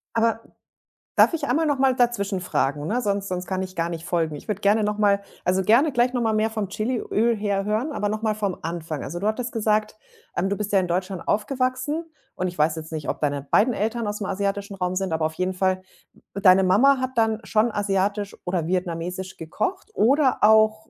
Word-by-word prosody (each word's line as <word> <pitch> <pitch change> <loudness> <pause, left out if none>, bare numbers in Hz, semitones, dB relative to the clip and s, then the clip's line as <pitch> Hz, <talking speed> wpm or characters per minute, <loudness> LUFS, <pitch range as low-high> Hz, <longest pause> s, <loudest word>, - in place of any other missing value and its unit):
Aber 225 0 +2 0.7
darf - - +5
ich 330 - -2
einmal 310 +6 +2
noch 290 -2 +1
mal 265 -1 +3
dazwischen 205 -6 0
fragen, 145 -3 -1
ne, 245 +3 0
sonst 200 -2 -1
sonst 180 0 -3
kann 190 -1 -2
ich 185 0 -6
gar 170 0 -1
nicht 165 0 -6
folgen. 165 -4 -1
Ich - - -11
würde 210 -1 -3
gerne 210 +2 +3
noch 210 0 -1
mal 200 -1 +3 0.2
also, 185 +1 +2
gerne 255 +9 +4
gleich 245 +1 +2
noch 245 - 0
mal 220 -1 +1
mehr 215 +1 +1
vom 215 -3 -3
Chiliöl 230 +1 0
her 200 -2 -1
hören, 220 +8 -1
aber 205 -7 -1
noch 215 +1 -3
mal 215 -2 0
vom 200 -4 -2
Anfang. 165 -3 -4
Also, 175 +5 -5
du 205 - -1
hattest 235 +2 -2
gesagt, 215 -1 0 0.4
ähm, 190 +2 0
du 200 - 0
bist 210 -1 -3
ja 195 - +4
in 180 - -1
Deutschland 185 +1 -3
aufgewachsen, 255 +7 -1 0.3
und 185 - -1
ich 175 - -7
weiß 155 +1 +2
jetzt 160 0 -7
nicht, 155 -2 -5
ob - - -2
deine 145 -1 0
beiden 225 - +3
Eltern 225 +1 -2
aus'm 205 -1 -3
asiatischen 200 +1 -2
Raum 180 -1 -2
sind, 190 -2 -1
aber 160 -1 0
auf 160 - -2
jeden 185 +1 -1
Fall 185 0 0 0.5
d 200 - -5
deine 190 -1 +6
Mama 250 +10 +5
hat 260 0 -2
dann 220 -1 +2
schon 215 +4 +1
asiatisch 200 0 -1
oder 175 -3 -1
vietnamesisch 180 +1 -3
gekocht 370 - -4
oder 265 +4 +3
auch 215 0 +4
205 Hz, 220 wpm, -24 LUFS, 185-225 Hz, 0.7 s, deine